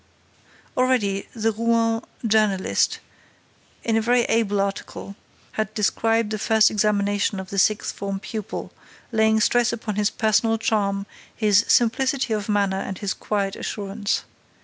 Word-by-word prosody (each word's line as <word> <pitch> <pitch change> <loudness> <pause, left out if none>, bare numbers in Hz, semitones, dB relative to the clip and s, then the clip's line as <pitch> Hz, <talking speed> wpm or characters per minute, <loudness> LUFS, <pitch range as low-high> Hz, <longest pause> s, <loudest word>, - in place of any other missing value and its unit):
Already, 235 -7 +1
the 225 0 +1
Rouen 230 0 +1 0.2
journalist, 210 -3 +2 0.9
in 225 - 0
a 225 - +3
very 240 +2 +3
able 215 -4 +1
article, 200 0 -4 0.4
had 215 -1 -2
described 225 +1 +1
the 215 - -2
first 220 +1 +4
examination 205 -1 +1
of 190 0 -8
the 195 - 0
sixth 210 +3 +2
form 195 -1 -4
pupil, 210 +1 -6 0.4
laying 220 -1 +3
stress 240 +2 +3
upon 215 -3 -4
his 210 0 +2
personal 225 +1 +1
charm, 200 -3 0 0.3
his 210 -1 +3
simplicity 260 +1 +2
of 210 0 -3
manner 200 -2 +1
and 190 -1 -5
his 200 -2 -2
quiet 200 -2 -2
assurance. 200 0 -3
215 Hz, 135 wpm, -23 LUFS, 200-225 Hz, 0.9 s, first